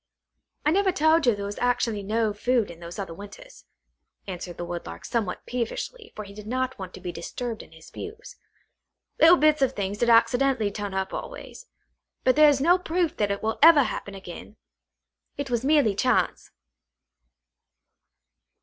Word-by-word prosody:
"I 300 - +4
never 385 +2 +3
told 315 -2 +3
you 235 - +4
there 200 0 -5
was 205 0 -6
actually 240 -3 0
no 215 +1 0
food 235 0 0
in 170 - -13
those 170 0 -9
other 190 -5 -5
winters," 205 - -12 0.6
answered 180 -2 -7
the 175 - -4
Woodlark 170 - -7
somewhat 220 -6 -2
peevishly, 330 - -4
for 215 - -6
he 200 -1 -12
did 210 0 -10
not 255 +1 -2
want 185 -1 -7
to - - -10
be 175 - -5
disturbed 225 +7 -5
in - - -16
his 160 0 -16
views. 435 +2 -9 0.8
"little 335 +2 +8
bits 305 -1 +3
of 265 -1 +2
things 200 -1 -3
did 240 - +2
accidentally 235 -1 +3
turn 200 -1 -5
up 190 0 -2
always. - - -8 0.6
But 255 - +3
there 305 0 +7
is 280 -2 +2
no 345 +6 +4
proof 345 -2 -1
that 205 -1 +1
it 200 +1 -3
will 220 0 -1
ever 310 -2 +8
happen 200 -5 -5
again. 190 +2 -10 0.8
It 280 -3 -4
was 240 0 0
merely 285 -7 +3
chance!" 195 - 0
230 Hz, 170 wpm, -25 LUFS, 200-295 Hz, 0.8 s, little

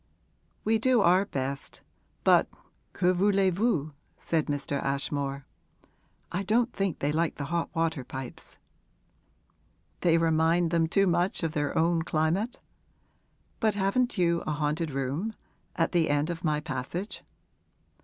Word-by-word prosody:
'We 220 0 +2
do 250 0 +3
our 185 +2 +4
best, 135 -5 -4 0.4
but - - +5 0.4
que 180 0 +2
voulez 195 0 +3
vous?' 170 -7 0 0.2
said 160 -2 0
Mr. 145 -1 -2
Ashmore. 140 0 -2 0.9
'I 180 - -1
don't 230 +4 +1
think 195 -5 -1
they 145 - 0
like 165 +2 0
the 145 - -4
hot 170 -1 0
water 165 -4 0
pipes.' 130 0 -9 1.4
'They 165 -1 +3
remind 165 +1 +2
them 165 -1 +2
too 195 +4 +3
much 175 0 +1
of 165 - 0
their 145 +1 -1
own 165 +1 +3
climate? 165 +10 0 1.0
But 220 -3 +2
haven't 210 +5 +1
you 170 -2 +2
a 155 - 0
haunted 150 +2 -1
room 140 +11 -2 0.4
at 165 - +1
the 165 -3 +2
end 145 +3 +1
of 165 -1 -6
my 150 -2 +1
passage?' 150 +7 -5
165 Hz, 135 wpm, -28 LUFS, 150-190 Hz, 1.4 s, but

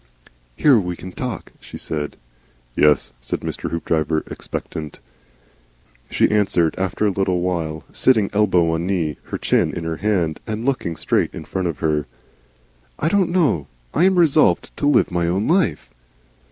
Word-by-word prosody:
"Here, 135 -6 +5
we 90 -3 -3
can 90 +2 -9
talk," 125 +1 -5
she - - -10
said. 75 -2 -4 0.6
"Yes," 75 -5 +3
said - - -3
Mr. - - -3
Hoopdriver, 80 -1 0
expectant. 75 -2 -6 1.1
She - - +2
answered 95 -6 +2
after 95 +3 0
a 105 - +3
little 95 -2 0
while, 80 -4 -2
sitting, 110 -6 +3
elbow 95 -5 +3
on 80 +2 -1
knee, 85 -7 -1
with - - -25
her - - -2
chin - - +1
in 85 - -4
her 80 -1 -3
hand, 90 -7 0
and 110 +2 -3
looking 130 -12 -1
straight - - 0
in - - -7
front 95 -1 -2
of 85 - -3
her. 75 -2 0 0.9
"I 155 - 0
don't 195 -1 +2
know 145 - +1 0.3
I 170 - +3
am 190 -1 +3
resolved 155 -3 +3
to 145 - 0
Live 145 -9 +3
my 85 -1 0
Own 95 +5 0
Life." 170 - +1
90 Hz, 165 wpm, -21 LUFS, 80-115 Hz, 1.1 s, Here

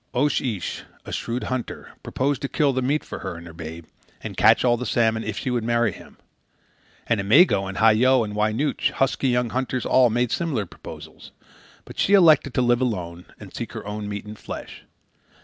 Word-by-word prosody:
Oche 145 +4 +2
Ish, 105 -9 -3 0.2
a - - -8
shrewd 120 +2 -3
hunter, 130 -2 -5
proposed 140 +1 -1
to 140 - -3
kill 145 -3 +1
the 130 - -1
meat 140 +4 0
for - - -8
her - - -5
and 85 +1 -10
her 85 - -11
babe, 80 0 -8 0.4
and - - -7
catch - - +5
the 120 -1 +2
salmon, 110 -1 +1
if 110 -1 -4
she 130 - -2
would 120 -2 -1
marry 115 -1 +1
him. - - -14 0.9
And 115 -3 +1
Imego 100 - +4
and 95 - -7
Hah 110 +1 +6
Yo 125 +3 +4
and 105 -1 -6
Wy 105 +1 +1
Nooch, 140 +7 0
husky 135 0 0
young 125 -2 0
hunters 130 0 -2
all, 130 -2 +4
made 120 +1 0
similar 145 -12 -1
proposals. - - -12 0.6
But - - -11
she 200 - +2
elected 155 -8 +5
to 125 - +2
live 120 0 +2
alone 90 -8 -3
and - - -12
seek - - -6
her - - -7
own 105 0 -5
meat 100 0 -5
and 105 0 -10
fish. - - -9
120 Hz, 200 wpm, -23 LUFS, 105-130 Hz, 0.9 s, Hah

